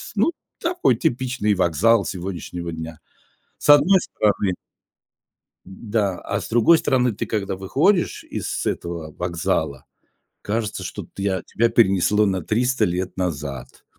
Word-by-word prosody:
ну, - - +3 0.3
такой 345 - +1
типичный 125 -2 0
вокзал 100 +5 +3
сегодняшнего 90 -2 -5
дня, 80 0 -7 0.6
с - - -5
одной 155 +7 +7
стороны. 100 - 0 1.1
Да, 100 0 -2
а - - -2
с - - -7
другой 120 +9 +5
стороны, 125 -4 +2
ты - - -4
когда 100 -3 -2
выходишь 150 - +1
из - - -4
этого 85 -3 -4
вокзала, 70 -5 -2 0.6
кажется, 105 -2 -2
что 90 +1 -6
ты 100 0 -2
а, 95 -1 -1
тебя 115 +1 +1
перенесло 105 -2 +3
на 95 -2 0
300 120 +5 +1
лет 90 -1 -2
назад. 75 -8 -5
100 Hz, 130 wpm, -22 LUFS, 90-115 Hz, 1.1 s, одной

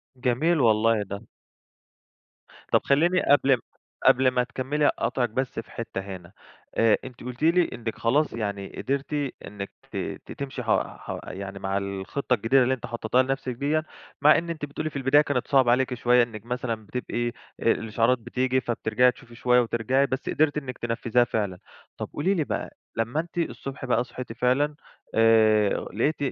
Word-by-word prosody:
جميل 135 +7 +1
والله 110 -2 +3
ده. 100 +1 -6 1.5
طب - - +4
خلّيني 170 +6 +3
قبل 135 -3 +4 0.4
قبل 130 +1 +6
ما 125 0 +2
تكمّلي 145 +4 0
أقاطعِك 120 -3 0
بس 130 0 -2
في 115 - -9
حتّة 115 -4 -5
هنا، 95 -2 -9 0.4
آآ، 115 -1 +4
أنتِ 125 -2 -10
قلتِ 125 +3 -6
لي 170 +1 +4
إنِّك 115 -1 -4
خلاص 145 +7 +2
يعني 100 -3 -3
قدرتِ 140 +2 -2 0.3
إنِّك 100 -1 -7 0.2
ت - - -5
تمشي 135 -2 -5
ح 110 - -6 0.3
ح - - -6
يعني 100 +1 -6
مع 95 0 -1
الخطّة 100 +7 -2
الجديدة 125 +3 +4
اللي 130 +2 +2
أنتِ 125 -1 -5
حطيتيها 120 +1 +1
لنفسِك 135 -1 -2
ديّا، 145 +5 0 0.4
مع 150 +1 +7
إن 170 +1 -3
أنتِ 155 -3 -3
بتقولي 155 +2 -4
في 145 - -19
البداية 140 +2 +4
كانت 145 -4 -1
صعبة 130 -4 +4
عليكِ 130 +1 +2
شويّة، 120 0 +4
إنِّك 115 -2 -7
مثلًا 120 -3 -3
بتبقي 120 0 -3 0.3
الإشعارات 115 +2 +2
بتيجي 130 +2 0
فبترجعي 120 +1 +2
تشوفي 120 -1 -16
شويّة 125 +1 +3
وترجعي، 120 +4 +1
بس 130 - -3
قدرتِ 150 -1 +2
إنِّك 130 -4 -5
تنفّذيها 120 +1 +1
فعلًا، 100 -6 -2 0.4
طب - - -5
قولي 185 +7 +1
لي 170 -5 +1
بقى - - -4 0.2
لمّا 115 +6 -1
أنتِ 170 +1 -6
الصبح 135 -5 -3
بقى 120 -1 +2
صحيتِ 125 -1 -8
فعلًا، 130 +5 +1 0.4
آآ 110 -2 +5 0.2
لقيتِ 130 +9 +1
125 Hz, 165 wpm, -26 LUFS, 115-135 Hz, 1.5 s, مع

